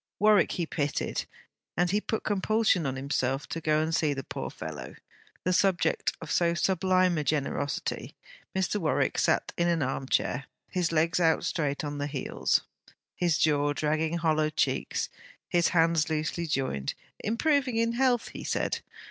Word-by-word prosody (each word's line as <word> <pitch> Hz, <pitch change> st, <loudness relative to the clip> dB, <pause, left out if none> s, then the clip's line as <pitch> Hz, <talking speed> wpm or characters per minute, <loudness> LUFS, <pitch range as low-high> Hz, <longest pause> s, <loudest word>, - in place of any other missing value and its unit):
Warwick 210 Hz, 0 st, +4 dB
he 175 Hz, -, -1 dB
pitied, 145 Hz, -3 st, -2 dB, 0.5 s
and 175 Hz, 0 st, +2 dB
he 205 Hz, +2 st, +2 dB
put 220 Hz, -, -2 dB
compulsion 205 Hz, -4 st, +2 dB
on 130 Hz, -, -2 dB
himself 135 Hz, 0 st, -1 dB
to 165 Hz, -, -4 dB
go 155 Hz, 0 st, +2 dB
and 160 Hz, +1 st, -2 dB
see 150 Hz, -3 st, +2 dB
the 135 Hz, -, -4 dB
poor -, -, -5 dB
fellow, -, -, -7 dB, 0.5 s
the 185 Hz, -, +1 dB
subject 190 Hz, 0 st, +2 dB
of 165 Hz, -, -7 dB
so 170 Hz, -1 st, +2 dB
sublime 185 Hz, -1 st, +2 dB
a -, -, -1 dB
generosity. 145 Hz, -1 st, -2 dB, 0.4 s
Mr. 190 Hz, +2 st, +1 dB
Warwick 145 Hz, -7 st, +1 dB
sat -, -, +1 dB
in 170 Hz, -, +3 dB
an 170 Hz, -3 st, +2 dB
arm 130 Hz, +1 st, -2 dB
chair, 135 Hz, +3 st, 0 dB, 0.2 s
his 180 Hz, -2 st, 0 dB
legs 165 Hz, +2 st, +2 dB
out 165 Hz, -2 st, +3 dB
straight 145 Hz, -2 st, -1 dB
on 145 Hz, -1 st, -4 dB
the 145 Hz, -, -1 dB
heels, 140 Hz, -3 st, 0 dB, 0.5 s
his 170 Hz, -3 st, +2 dB
jaw 145 Hz, -1 st, +2 dB
dragging 155 Hz, +3 st, 0 dB
hollow 155 Hz, -2 st, +2 dB
cheeks, 155 Hz, -, -1 dB, 0.4 s
his 175 Hz, -1 st, +3 dB
hands 165 Hz, -2 st, +3 dB
loosely 160 Hz, +2 st, -1 dB
joined; 130 Hz, -, -1 dB, 0.2 s
improving 260 Hz, +3 st, +1 dB
in 230 Hz, 0 st, +2 dB
health, 245 Hz, -1 st, +2 dB
he -, -, -8 dB
said. -, -, -1 dB
165 Hz, 160 wpm, -28 LUFS, 145-185 Hz, 0.5 s, Warwick